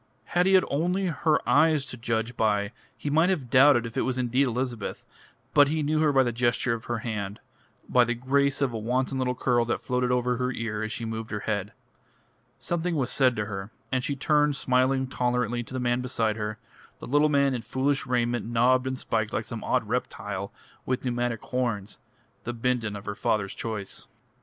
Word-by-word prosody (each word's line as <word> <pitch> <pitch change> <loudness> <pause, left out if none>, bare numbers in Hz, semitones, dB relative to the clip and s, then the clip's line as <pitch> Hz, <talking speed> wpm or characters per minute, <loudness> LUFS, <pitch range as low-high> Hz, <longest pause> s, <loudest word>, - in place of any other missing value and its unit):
Had 180 +1 +3
he 190 - +5
had 185 - +5
only 180 +6 0
her 160 -1 +1
eyes 155 -1 +4
to 125 - -6
judge 115 0 -2
by 105 -2 +1 0.3
he 145 - -3
might 160 +4 +4
have 145 -11 -2
doubted 130 -2 +6
if 115 +1 -7
it 135 - +1
was 130 -1 -1
indeed 125 +2 +2
Elizabeth, 125 -2 -3 0.5
but 145 -1 +7
he 155 +1 0
knew 155 +1 +1
her 155 -1 +4
by 135 -1 +4
the 120 - 0
gesture 120 +1 +1
of 115 -1 -6
her 120 - -2
hand, 105 -3 -4 0.5
by 125 - +5
the 120 0 -1
grace 140 +3 +1
of 135 -4 +1
a 115 - -3
wanton 130 +4 -1
little 125 -1 0
curl 120 -1 +2
that 120 - -1
floated 125 -1 0
over 125 0 +1
her 125 +1 -1
ear 110 -3 -3
as 110 0 -3
she 115 - -4
moved 110 0 -4
her 105 -1 -3
head. 105 -2 -2 0.9
Something 175 0 -2
was 135 -5 0
said 130 -3 +3
to 105 - -2
her, 95 -1 -5 0.2
and 130 -1 0
she 140 - -1
turned 150 +1 +2
smiling 130 +1 +2
tolerantly 125 -2 -1
to 120 - -10
the - - -1
man 120 0 +1
beside 115 -3 0
her, 105 -1 -4 0.4
a - - -8
little 145 +3 +3
man 140 -2 +3
in 125 - -2
foolish 135 +4 -1
raiment 120 -2 0
knobbed 125 +2 +3
and 130 0 -2
spiked 110 -3 -1
like 110 - -2
some 115 -1 -6
odd 125 -4 0
reptile 105 -4 -3 0.3
with 130 +1 -2
pneumatic 120 -2 -1
horns 115 -5 -2 0.4
the 120 - -4
Bindon 115 -3 -1
of 100 0 -8
her 105 - -3
father's 100 -1 -1
choice. 105 -4 -5
125 Hz, 205 wpm, -27 LUFS, 115-135 Hz, 0.9 s, but